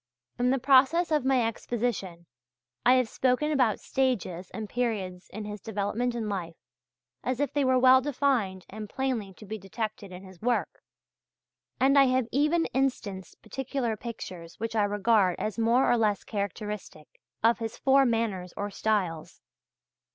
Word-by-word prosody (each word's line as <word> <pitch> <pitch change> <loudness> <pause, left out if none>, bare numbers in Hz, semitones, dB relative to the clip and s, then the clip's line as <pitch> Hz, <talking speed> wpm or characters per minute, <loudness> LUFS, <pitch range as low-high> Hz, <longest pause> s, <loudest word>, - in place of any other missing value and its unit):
In 245 +1 +2
the 265 - +3
process 275 +6 +4
of 300 -4 +2
my 260 -3 +3
exposition 220 -7 -3 0.6
I 250 - +6
have 255 -2 +3
spoken 255 +6 +1
about 255 -7 +2
stages 200 -9 -1
and 220 -1 -6
periods 200 -7 -3
in 215 +1 -7
his 210 -1 -7
development 220 +3 -2
and 225 -2 -3
life, 180 -5 -4 0.7
as 255 0 -2
if 285 - -1
they 290 - +2
were 260 -1 +3
well 260 +1 +7
defined 250 -9 0
and 215 0 -8
plainly 250 -7 -2
to 210 - -12
be 215 +2 -6
detected 205 +1 -5
in 180 +1 -9
his 185 -2 -14
work, 245 +2 -1 1.0
and 275 +2 +5
I 275 - +7
have 255 -1 +2
even 305 +5 +2
instanced 230 -8 -2
particular 265 -3 -3
pictures 185 -7 -8
which 225 +1 -3
I 210 -2 +3
regard 205 -2 +2
as 215 +2 -3
more 235 +3 +3
or 240 - +4
less 210 -3 +1
characteristic 205 -5 -6 0.2
of 230 +2 +4
his 225 -1 -5
four 275 0 +4
manners 225 -7 -1
or 205 0 -3
styles. 185 -7 -1
225 Hz, 160 wpm, -28 LUFS, 200-260 Hz, 1.0 s, well